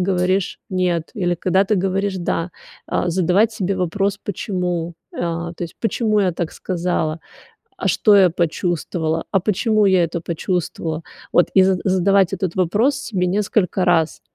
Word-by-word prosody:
говоришь 185 Hz, +1 st, 0 dB
нет 180 Hz, -3 st, -1 dB
или 175 Hz, -5 st, 0 dB
когда 190 Hz, +3 st, +2 dB
ты 210 Hz, +2 st, +1 dB
говоришь 195 Hz, +1 st, 0 dB
да, 170 Hz, 0 st, -2 dB, 0.4 s
а, 175 Hz, -, -1 dB
задавать 185 Hz, +5 st, +2 dB
себе 195 Hz, -2 st, -2 dB
вопрос 195 Hz, +3 st, -1 dB
почему, 180 Hz, -4 st, -3 dB, 0.3 s
а 170 Hz, 0 st, -2 dB
то 175 Hz, -, -7 dB
есть, 165 Hz, -, -10 dB
почему 220 Hz, -2 st, +1 dB
я 185 Hz, -3 st, +1 dB
так 170 Hz, -1 st, -4 dB
сказала? 175 Hz, -3 st, -2 dB, 0.6 s
А -, -, -1 dB
что 210 Hz, -, +4 dB
я 195 Hz, -2 st, +7 dB
почувствовала? 165 Hz, -1 st, -1 dB
А 195 Hz, -, +2 dB
почему 215 Hz, +2 st, +2 dB
я 185 Hz, -2 st, +4 dB
это 170 Hz, +1 st, -3 dB
почувствовала? 165 Hz, -1 st, -3 dB, 0.3 s
Вот 175 Hz, -, +4 dB
и 190 Hz, -, +7 dB
з 190 Hz, -1 st, +2 dB
задавать 190 Hz, 0 st, +3 dB
этот 185 Hz, -3 st, -3 dB
вопрос 210 Hz, -, +2 dB
себе 200 Hz, -9 st, -2 dB
несколько 195 Hz, -1 st, 0 dB
раз. 160 Hz, -2 st, +2 dB
185 Hz, 155 wpm, -20 LUFS, 170-195 Hz, 0.6 s, я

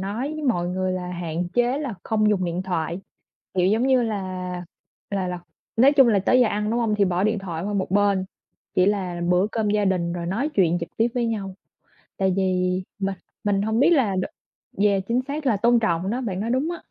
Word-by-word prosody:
nói 225 Hz, +10 st, -3 dB
với 310 Hz, -, -5 dB
mọi 175 Hz, -10 st, +1 dB
người 185 Hz, 0 st, -1 dB
là 180 Hz, -1 st, -4 dB
hạn 175 Hz, 0 st, -3 dB
chế 245 Hz, +3 st, +2 dB
là 270 Hz, -8 st, -3 dB
không 215 Hz, -1 st, +2 dB
dùng 190 Hz, -3 st, +1 dB
điện 175 Hz, +2 st, -2 dB
thoại, 175 Hz, -1 st, -2 dB, 0.5 s
kiểu, 180 Hz, -1 st, +2 dB
giống 220 Hz, +6 st, +2 dB
như 260 Hz, -2 st, +4 dB
là 210 Hz, -4 st, -2 dB, 0.9 s
là 190 Hz, -2 st, -1 dB
là 180 Hz, -1 st, -4 dB, 0.4 s
nói 265 Hz, +5 st, +6 dB
chung 270 Hz, -4 st, +6 dB
là 205 Hz, -3 st, +4 dB
tới 250 Hz, +7 st, +3 dB
giờ 245 Hz, -, +5 dB
ăn 210 Hz, +1 st, -1 dB
đúng 240 Hz, +1 st, +1 dB
hông, 220 Hz, -2 st, +1 dB
thì 205 Hz, -1 st, +3 dB
bỏ 180 Hz, +1 st, 0 dB
điện 215 Hz, -1 st, +1 dB
thoại 175 Hz, -3 st, -5 dB
qua 205 Hz, -, -2 dB
một 190 Hz, -2 st, -1 dB
bên, 200 Hz, -1 st, +2 dB, 0.5 s
chỉ 185 Hz, +1 st, +4 dB
là 185 Hz, -4 st, -1 dB
bữa 180 Hz, +2 st, +3 dB
cơm 215 Hz, -2 st, 0 dB
gia 210 Hz, -1 st, +2 dB
đình 180 Hz, -3 st, 0 dB
rồi 170 Hz, -1 st, -4 dB
nói 225 Hz, -, -1 dB
chuyện 175 Hz, -4 st, +3 dB
trực 170 Hz, -, -5 dB
tiếp 230 Hz, +2 st, +3 dB
với 240 Hz, -2 st, +1 dB
nhau. 200 Hz, -4 st, -3 dB, 0.6 s
Tại 190 Hz, -2 st, +2 dB
vì 185 Hz, -1 st, +1 dB, 0.2 s
mình 195 Hz, 0 st, -1 dB, 0.3 s
mình 200 Hz, -1 st, +1 dB
hông 220 Hz, +2 st, 0 dB
biết 285 Hz, -, +5 dB
đ -, -, +5 dB, 0.8 s
yeah, 200 Hz, -2 st, +3 dB
chính 240 Hz, +2 st, +1 dB
xác 290 Hz, +1 st, -4 dB
là 230 Hz, -6 st, +3 dB
tôn 235 Hz, +3 st, +4 dB
trọng 180 Hz, -3 st, 0 dB
đó, 245 Hz, +4 st, -1 dB
bạn 195 Hz, -7 st, -3 dB
nói 220 Hz, +3 st, -2 dB
đúng 260 Hz, +7 st, +1 dB
á. 345 Hz, -, -4 dB
200 Hz, 225 wpm, -24 LUFS, 185-230 Hz, 0.9 s, nói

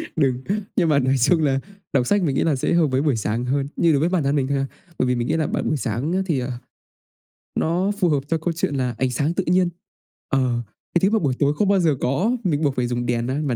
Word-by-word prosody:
đừng, 130 Hz, -4 st, +1 dB, 0.3 s
nhưng 170 Hz, -4 st, +2 dB
mà 140 Hz, -2 st, +4 dB
nói 130 Hz, +1 st, +2 dB
chung 160 Hz, +6 st, +3 dB
là 135 Hz, -2 st, +2 dB, 0.3 s
đọc 125 Hz, -3 st, +2 dB
sách 205 Hz, -2 st, +2 dB
mình 140 Hz, -4 st, 0 dB
nghĩ -, -, +2 dB
là 160 Hz, -3 st, +2 dB
sẽ 130 Hz, -, 0 dB
hợp 170 Hz, -3 st, +4 dB
với 130 Hz, 0 st, +1 dB
buổi 145 Hz, -4 st, +1 dB
sáng 110 Hz, +3 st, -2 dB
hơn, 135 Hz, +2 st, 0 dB
như 170 Hz, -, +3 dB
đối 140 Hz, -, +3 dB
với 165 Hz, +4 st, +2 dB
bản 180 Hz, -5 st, +1 dB
thân 140 Hz, +2 st, +1 dB
mình 135 Hz, -2 st, +1 dB
thôi 140 Hz, -, 0 dB
ha. 135 Hz, -, 0 dB, 0.3 s
Bởi 130 Hz, -, +2 dB
vì 125 Hz, -, +2 dB
mình 120 Hz, 0 st, -2 dB
nghĩ -, -, 0 dB
là 155 Hz, -2 st, 0 dB
bạn -, -, -2 dB
buổi 155 Hz, -, +1 dB
sáng 125 Hz, +5 st, -2 dB
á 190 Hz, -, +1 dB
thì, 160 Hz, -7 st, 0 dB
ờ, 125 Hz, +1 st, -3 dB, 1.1 s
nó 180 Hz, +5 st, +1 dB
phù 180 Hz, -3 st, +3 dB
hợp 145 Hz, -3 st, +2 dB
cho 165 Hz, +1 st, +1 dB
câu 165 Hz, +2 st, -2 dB
chuyện 160 Hz, -3 st, -2 dB
là 125 Hz, -3 st, -1 dB
ánh 130 Hz, -1 st, +1 dB
sáng 145 Hz, +6 st, 0 dB
tự 190 Hz, -, -1 dB
nhiên, 180 Hz, 0 st, +3 dB, 0.6 s
ờ, 125 Hz, -3 st, +1 dB, 0.3 s
cái 175 Hz, -, +4 dB
thứ 195 Hz, -, +4 dB
mà 220 Hz, -, +2 dB
buổi 140 Hz, -8 st, 0 dB
tối 145 Hz, 0 st, +3 dB
không 205 Hz, -, +1 dB
bao 200 Hz, -1 st, +4 dB
giờ 160 Hz, -5 st, +2 dB
có 145 Hz, -, +1 dB
á, -, -, -18 dB
mình 145 Hz, +1 st, 0 dB
buộc 140 Hz, -3 st, +1 dB
phải 125 Hz, -1 st, 0 dB
dùng 120 Hz, 0 st, -2 dB
đèn 120 Hz, -1 st, -1 dB
á, 130 Hz, +3 st, -1 dB
mà 125 Hz, -, 0 dB
140 Hz, 290 wpm, -22 LUFS, 130-165 Hz, 1.1 s, mà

